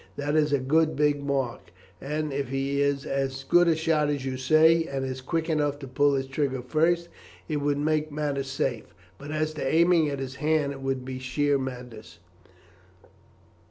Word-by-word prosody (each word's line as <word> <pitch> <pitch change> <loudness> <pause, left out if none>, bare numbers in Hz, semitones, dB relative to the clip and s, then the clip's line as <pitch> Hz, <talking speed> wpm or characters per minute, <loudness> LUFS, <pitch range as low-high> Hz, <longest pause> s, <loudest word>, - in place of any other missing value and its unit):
That 145 +1 -2
is 150 -1 +3
a 140 - +4
good 155 +4 +2
big 145 0 +2
mark, 135 -4 -2 0.3
and 150 +1 -3
if 135 -2 -2
he 135 +1 -1
is 140 -1 0
as 135 0 -2
good 175 +6 +4
a 165 - +4
shot 155 -2 +1
as 140 -2 -2
you 130 -1 -2
say, 155 +5 +4
and 135 -3 -3
is 130 0 -5
quick 160 +5 -2
enough 150 -3 0
to 140 -2 -9
pull 140 +2 +2
his 135 -1 -1
trigger 135 -1 -2
first, 165 +5 +1 0.4
it 155 - -1
would 145 0 0
make 155 +1 0
matters 145 -2 -2
safe, 135 -4 -3 0.2
but 145 - -9
as 155 0 -1
to 155 - -5
aiming 165 +2 +3
at 140 - -3
his 130 -1 -6
hand 150 -2 +1
it 135 -1 -8
would 135 -1 -2
be 130 0 -5
sheer 140 +2 0
madness. 125 -9 -8
140 Hz, 190 wpm, -26 LUFS, 135-155 Hz, 0.4 s, a